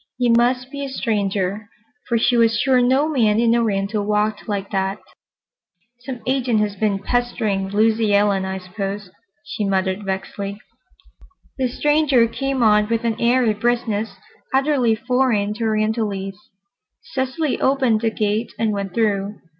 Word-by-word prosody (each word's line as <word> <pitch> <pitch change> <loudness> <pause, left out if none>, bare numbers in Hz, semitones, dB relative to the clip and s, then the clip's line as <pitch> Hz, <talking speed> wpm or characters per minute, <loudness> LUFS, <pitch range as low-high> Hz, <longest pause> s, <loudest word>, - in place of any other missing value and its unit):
He 245 -1 +1
must 250 +2 +2
be 280 -1 -5
a 275 - -4
stranger, 205 -4 -2 0.4
for 235 - +2
she 235 +2 +2
was 230 -1 +3
sure 260 -2 +3
no 260 +4 +3
man 225 -8 +2
in 230 0 +3
Oriental 210 -2 0
walked 210 +2 -1
like 200 -1 -3
that. 195 0 -1 1.0
"Some 245 -1 -7
agent 255 -4 +1
has 205 -1 -1
been 205 0 0
pestering 215 -3 -1
Lucy 215 +1 +2
Ellen, 200 -1 +2
I 190 0 -3
suppose," 195 +1 -6 0.3
she 215 - -4
muttered 190 0 0
vexedly. 195 +1 -4 1.0
The 260 - +2
stranger 290 -1 +3
came 270 +2 -2
on 210 -1 +4
with 230 0 0
an 230 -2 -1
airy 240 -1 +3
briskness 220 -2 -1 0.4
utterly 265 -4 +2
foreign 235 -3 +1
to 225 +1 -3
Orientalites. 215 -2 -2 0.5
Cecily 275 0 -2
opened 260 -5 +2
the 230 - +2
gate 215 +1 -1
and 220 -2 0
went 195 -2 -4
through. 205 -2 0
220 Hz, 145 wpm, -21 LUFS, 205-245 Hz, 1.0 s, on